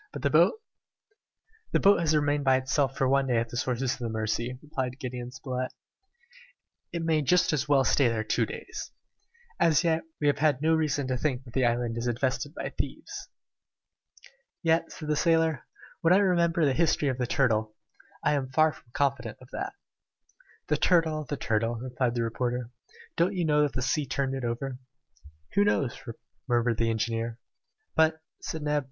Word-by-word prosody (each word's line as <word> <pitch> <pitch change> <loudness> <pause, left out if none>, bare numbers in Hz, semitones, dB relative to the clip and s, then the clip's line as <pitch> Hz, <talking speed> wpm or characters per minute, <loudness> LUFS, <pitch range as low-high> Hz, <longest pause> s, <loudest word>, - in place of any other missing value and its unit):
"But - - -7
the - - +2
boat?" - - +5 1.2
"The - - +4
boat 200 -2 +5
has 160 -2 +2
remained 145 -1 +1
by 135 -1 +4
itself 135 +1 0
for 135 - +2
one 135 +1 +2
day 125 -2 +2
at 115 0 0
the - - -8
sources 125 +1 0
of - - -9
the 120 -2 -3
Mercy," 110 +3 -2
replied 130 -4 -3
Gideon 125 -2 -5
Spilett; 130 -1 -4 1.2
"it 170 -1 -3
may 160 -2 +2
just 180 +5 +3
as 145 -1 -1
well 140 -2 +5
stay 130 +1 +3
there 115 -2 0
two 110 - 0
days! - - -7 0.7
As 155 -4 +4
yet, 165 -1 +2 0.2
we 150 - -2
have 145 - +3
had 150 -4 +3
no 160 +2 +2
reason 150 -3 +1
to 130 0 -1
think 130 -1 -1
that 120 -3 -14
the 130 -2 +2
island 120 -1 -1
is 120 - -2
infested 130 +5 -1
by - - -4
thieves!" - - -5 1.3
"Yet," 165 0 +2
said 155 - -8
the 150 - +1
sailor, 160 -3 +2 0.3
"when 165 +2 +4
I - - +6
remember 170 -4 +3
the 140 - +3
history 155 -2 +2
of 130 -1 -3
the 125 - 0
turtle, 110 -5 +1 0.5
I 150 - +3
am 135 -3 -1
far 155 +4 +4
from 130 - -18
confident 140 -1 -1
of 130 - -16
that." 390 +1 -4 0.9
"The - - +1
turtle! 160 -4 +2
the 145 - -4
turtle!" 115 -1 0
replied 125 0 -2
the 120 - 0
reporter. 120 +1 -2 0.5
"Don't 180 +4 +2
you 175 -2 0
know 150 -1 +3
that 145 -4 +1
the 130 - -2
sea 140 +2 0
turned 135 +1 -1
it 135 -1 -4
over?" 125 +2 -3 0.7
"Who 205 - +4
knows?" 145 -11 +1 0.5
murmured 120 -2 +2
the 115 0 +2
engineer. 115 +1 -2 0.6
"But 160 0 +3
" - - -47
said 160 -2 -5
Neb. 150 0 +1
135 Hz, 185 wpm, -28 LUFS, 120-155 Hz, 1.3 s, I